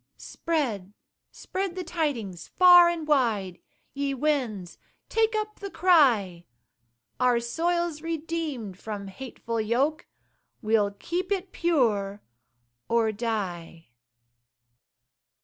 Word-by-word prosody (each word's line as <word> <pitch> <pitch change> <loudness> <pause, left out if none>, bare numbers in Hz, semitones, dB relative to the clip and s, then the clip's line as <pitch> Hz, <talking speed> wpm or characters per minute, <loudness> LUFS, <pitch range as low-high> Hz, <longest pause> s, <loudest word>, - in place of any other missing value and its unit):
Spread, 230 - -3 0.4
spread 380 -2 -4
the 370 - -4
tidings 260 - -3
far 355 -1 +7
and 330 -3 -4
wide, 220 - +1 0.3
Ye 280 0 -2
winds 245 - -2 0.3
take 445 0 +1
up 425 0 -3
the 400 - -6
cry: 240 - +3 0.7
"Our 250 -1 +3
soil's 335 +6 -1
redeemed 315 - -4
from 205 -2 -6
hateful 230 0 -5
yoke, 260 +8 0 0.5
We'll 215 -2 +2
keep 345 - -4
it 380 -2 -2
pure 215 - 0 0.7
or 230 -1 +2
die." 190 - -4
260 Hz, 95 wpm, -26 LUFS, 210-335 Hz, 0.7 s, far